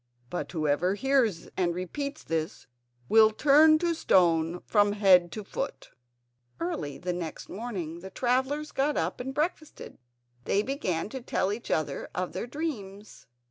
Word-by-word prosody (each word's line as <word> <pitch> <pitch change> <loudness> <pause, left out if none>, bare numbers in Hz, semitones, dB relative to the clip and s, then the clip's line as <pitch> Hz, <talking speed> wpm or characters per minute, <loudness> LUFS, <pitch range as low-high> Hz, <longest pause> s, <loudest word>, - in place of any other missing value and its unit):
But 180 - -4
whoever 160 +3 +1
hears 250 -6 +1
and 175 -2 0
repeats 280 - -5
this 160 -1 -3 0.4
will 220 - +7
turn 300 +7 +6
to 340 +1 0
stone 175 - +2
from 205 -1 +3
head 185 -4 +5
to 215 - -5
foot." 270 +7 -5 0.7
Early 150 -5 -3
next 175 -2 -5
morning 185 -7 -5
the 190 +2 -9
travellers 265 +7 0
got 285 +2 0
up - - -1
and 255 +2 -4
breakfasted. 310 +2 -4 0.5
They 200 - +2
began 205 - -2
to 265 +2 -6
tell 200 -4 0
each 230 +3 -7
other 150 -3 -1 0.2
their - - -5
dreams. 215 -9 -6
205 Hz, 140 wpm, -28 LUFS, 175-270 Hz, 0.7 s, will